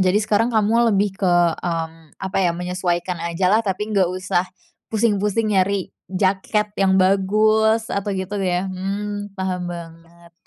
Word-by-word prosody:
jadi 185 +1 +3
sekarang 215 +2 +2
kamu 230 +1 +3
lebih 200 -1 +1
ke, 185 - +2
mmm, 165 -2 -1
apa 190 0 -5
ya 170 -2 +1
menyesuaikan 180 -1 -2
ajalah 185 +6 +2
tapi 210 +1 -3
nggak 190 -3 +3
usah 185 0 -1 0.4
pusing-pusing 210 -1 +1
nyari 195 0 +1 0.2
jaket 195 +2 0
yang 190 -1 +4
bagus 215 +4 +3
atau 200 0 -2
gitu 195 +2 -3
ya, 180 -1 0
mmm, 200 +2 -4
paham 185 -2 -3
banget. 170 0 -11
190 Hz, 140 wpm, -21 LUFS, 180-210 Hz, 0.4 s, yang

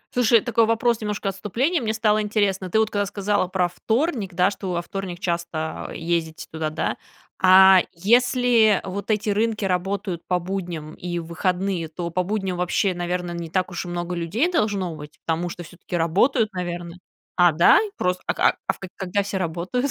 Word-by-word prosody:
Слушай, 235 -3 +5
такой 230 -2 +2
вопрос, 230 0 +1
немножко 210 -1 -2
отступление, 245 - -1
мне 220 -1 -1
стало 215 -1 +2
интересно: 200 -3 0
ты 220 - +1
вот 220 0 +2
когда 205 -1 0
сказала 200 -2 0
про 185 -1 +1
вторник, 220 - -1
да, 180 +3 +3
что 190 -2 -5
во 170 0 -2
вторник 185 -2 -6
часто, 170 -3 -3
э, - - -8
ездите 165 -1 -2
туда, 160 -1 -2
да. 155 - -2 0.4
А 190 0 +8
если 235 +2 +3
вот 200 +3 -6
эти 210 -1 +1
рынки 215 0 0
работают 185 -1 -2
по 180 - +2
будням 175 -4 -5
и 175 -1 -5
в 170 - -4
выходные, 180 +1 -1
то 170 +2 -5
по 185 - 0
будням 190 -2 -2
вообще, 180 +2 +1
наверное, 175 0 -3
не 170 -1 -5
так 185 +1 -1
уж 175 - -4
и - - -7
много 175 0 -3
людей 205 - 0
должно 200 - 0
быть, 150 0 -11
потому 170 +2 -1
что 175 - -7
всё-таки 175 +1 -6
работают, 210 - +2
наверное. 175 -1 -5 0.4
А, 175 -1 +5
да? 165 +3 +6
И 435 - -3
просто, 180 0 -1
а, - - +2
к - - -15
а - - +2
в - - -15
к 190 - -8
а - - -8
когда 195 +2 -1
все 195 -1 -3
работают? 185 - -2
185 Hz, 195 wpm, -23 LUFS, 175-210 Hz, 0.4 s, А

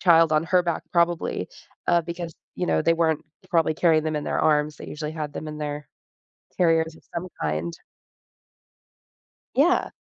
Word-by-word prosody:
child 165 -2 +6
on 155 0 +4
her 180 +1 +3
back 170 -2 -1
probably, 170 -1 +1 0.4
uh, 175 0 +4
because, 170 -1 -6 0.2
you 180 - -1
know, - - +2
they 165 - +4
weren't 160 -2 +1 0.3
probably 165 -2 +3
carrying 160 -2 +4
them 155 -1 -1
in 150 - -2
their - - 0
arms. 150 -1 +2
They - - -8
usually 150 0 -4
had 150 -2 -4
them 155 - -6
in 150 0 -6
their 150 -1 -4 0.7
carriers 165 -2 +3
of - - -18
some 175 +2 -3
kind. 80 +2 -1 1.8
Yeah. - - +3
160 Hz, 165 wpm, -25 LUFS, 150-170 Hz, 1.8 s, child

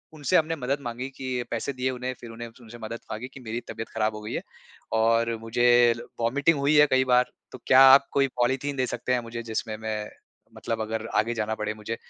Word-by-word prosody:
उनसे 145 -4 +2
हमने 165 +1 +1
मदद 135 +2 -1
माँगी 120 +1 -5
कि 130 -2 -3
पैसे 140 - -2
दिए 130 +1 -1
उन्हें 130 +1 -4
फिर 120 - -9
उन्हें 120 +1 -7
उनसे 120 +1 -12
मदद 115 +1 -6
माँगी 115 +4 -5
कि 135 - -10
मेरी 115 0 -4
तबियत 115 0 -6
खराब 110 -1 -1
हो 105 - -7
गई 105 - -6
है। - - -2 0.5
और 115 +1 +2
मुझे 120 +2 +1 0.5
वोमिटिंग 145 +7 +2
हुई 145 +2 +2
है 150 0 +7
कई 130 0 +4
बार, 125 0 +4 0.3
तो - - -8
क्या 130 0 +7
आप 140 0 +7
कोई 140 -1 +3
पॉलीथीन 135 +3 0
दे 130 - +1
सकते 125 +1 -2
हैं 125 - +2
मुझे 115 0 -7
जिसमें 110 -1 -3
मैं 110 -1 -4 0.5
मतलब 115 -1 -3
अगर 110 0 -3
आगे 115 +2 +2
जाना 110 0 -2
पड़े 105 0 -3
मुझे 110 +2 -5
120 Hz, 220 wpm, -26 LUFS, 110-130 Hz, 0.5 s, है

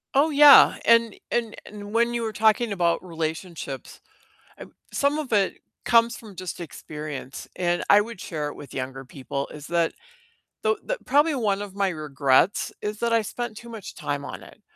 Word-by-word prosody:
Oh, 295 +4 +4
yeah, 290 -1 +8
and 230 -2 +4 0.2
and 230 -2 -1
and 205 0 -9
when 235 +1 +2
you 235 - -1
were 220 -1 -3
talking 220 +1 +2
about 175 -3 +1
relationships, 160 -4 -5 0.9
some 285 +2 +1
of 285 -6 -4
it 200 -2 +2 0.3
comes 235 0 +4
from 210 -4 -12
just 185 -1 -6
experience, 150 -3 -7
and 175 -1 0
I 205 - +8
would 230 -2 -7
share 150 -3 -4
it - - -9
with 145 - -11
younger 135 0 -5
people, 140 +1 -5
is 150 -1 -9
that 170 -1 +1 0.7
the 440 0 +2
the - - -2
probably 290 +3 +3
one 205 -5 0
of 200 -2 -8
my 200 -1 +1
regrets 150 +1 +1
is 210 0 -4
that 235 -1 0
I 230 - +4
spent 230 +1 -5
too 235 +1 -10
much 225 -4 -9
time 145 0 -4
on - - -8
it - - -16
205 Hz, 180 wpm, -25 LUFS, 160-235 Hz, 0.9 s, yeah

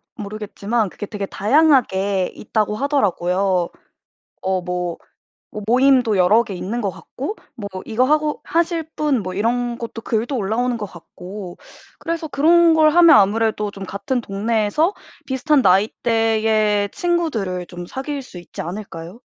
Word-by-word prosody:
모르겠지만 210 0 -3
그게 205 - -7
되게 205 -1 -4
다양하게 205 - +2
있다고 210 0 -1
하더라고요. 190 - +1 0.7
어 190 -1 0
뭐 180 -1 -3 0.7
모임도 250 -3 +4
여러 210 +6 +5
개 210 -4 -7
있는 220 +7 -3
것 200 - 0
같고, 285 - -7 0.2
뭐 205 -4 -6 0.2
이거하고 295 +7 +1
하실 335 0 0
분 280 -8 0
뭐 185 0 -5
이런 235 +3 -1
것도 230 -1 -6
글도 230 +5 -1
올라오는 235 +4 0
것 210 - -4
같고. 180 +1 -10 0.4
그래서 330 -1 -3
그런 330 +3 +4
걸 310 -1 +5
하면 335 -2 +7
아무래도 210 +1 +2
좀 195 -1 -8
같은 245 +8 -2
동네에서 220 - 0 0.3
비슷한 275 +2 +2
나이대의 215 0 +2
친구들을 230 - -1
좀 175 -1 -8
사귈 275 +7 -5
수 180 -7 -11
있지 175 - -8
않을까요? 180 +2 -7
220 Hz, 300 characters per minute, -20 LUFS, 195-270 Hz, 0.7 s, 하면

